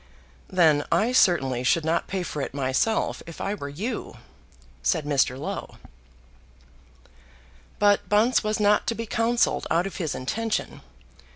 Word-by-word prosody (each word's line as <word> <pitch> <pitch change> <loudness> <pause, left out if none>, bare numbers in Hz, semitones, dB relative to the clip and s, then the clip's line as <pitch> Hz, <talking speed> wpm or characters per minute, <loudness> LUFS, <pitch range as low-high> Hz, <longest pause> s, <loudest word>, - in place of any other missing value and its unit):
"Then 160 -5 +4
I 225 +4 +2
certainly 135 - +3
should 155 +5 +2
not 165 +1 0
pay 190 -1 -2
for 150 -4 -4
it 135 - -5
myself 135 +11 0
if 165 - -10
I 200 - -2
were 145 -9 -6
you," 195 - -5 0.6
said 160 -5 0
Mr. 135 -3 +1
Low. 145 - -6 2.0
But 205 -1 +3
Bunce 220 +4 +3
was 215 0 -1
not 210 0 +3
to 230 - 0
be 230 - -4
counselled 230 +2 +1
out 170 +2 +2
of 195 - -6
his 160 -5 -2
intention. 220 - -3
180 Hz, 145 wpm, -25 LUFS, 145-215 Hz, 2.0 s, Then